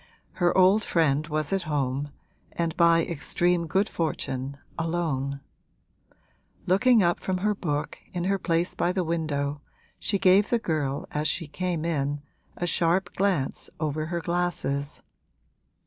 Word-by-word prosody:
Her 175 0 +1
old 190 +3 +5
friend 155 -4 +2
was 155 +1 -1
at 195 - +1
home 145 -3 -1 0.4
and 165 -2 -1
by 165 -1 +5
extreme 170 +2 0
good 195 +6 +2
fortune 140 -5 -3 0.2
alone; 155 -5 -2 1.2
looking 220 +4 +5
up 175 0 +2
from 185 -1 -1
her 210 +3 +1
book, 150 -7 -3
in 175 -1 -3
her 195 +1 +1
place 170 0 0
by 180 - 0
the 185 -1 0
window, 150 -4 -2 0.4
she 200 - 0
gave 190 +2 +5
the 240 - +3
girl 150 -9 -2
as 150 +1 0
she 165 -2 -1
came 170 0 -2
in 145 -3 -1 0.3
a 175 - -1
sharp 175 +1 +1
glance 185 -9 0
over 155 0 -1
her 170 0 -2
glasses. 170 -5 -2
165 Hz, 140 wpm, -26 LUFS, 145-180 Hz, 1.2 s, old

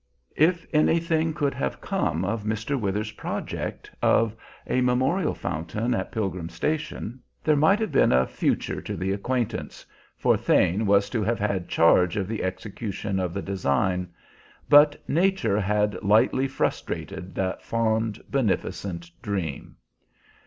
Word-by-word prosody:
If 170 +2 +3
anything 160 +1 +2
could 140 -1 0
have 65 - -3
come 80 +4 -1
of 105 +2 -2
Mr. 110 +6 -2
Withers's 105 -2 -2
project - - -5
of 115 -1 +3 0.3
a 130 - +1
memorial 130 +9 +1
fountain 105 +10 -2
at - - -2
Pilgrim 95 -6 -3
Station, 130 - -3 0.2
there 155 - +3
might 160 +8 +4
have 220 - -1
been - - +4
a 65 +1 +4
future - - -1
to - - -5
the 95 +3 -1
acquaintance, 120 +4 -3 0.3
for - - +3
Thane 95 +5 +2
was 100 0 +4
to 115 - 0
have 115 +2 0
had 100 -3 -2
charge 85 +2 +4
of 95 -2 -1
the 110 +1 -3
execution 95 +1 -3
of 90 -2 -1
the 100 +2 -4
design; 90 0 0 0.6
but 145 +1 +6
nature 185 - +2
had 105 -1 0
lightly 110 +6 +3
frustrated 95 -7 -3
that 95 -1 -2
fond, 110 -2 -1
beneficent 95 -8 -2
dream. 95 - -4
105 Hz, 140 wpm, -25 LUFS, 95-130 Hz, 0.6 s, but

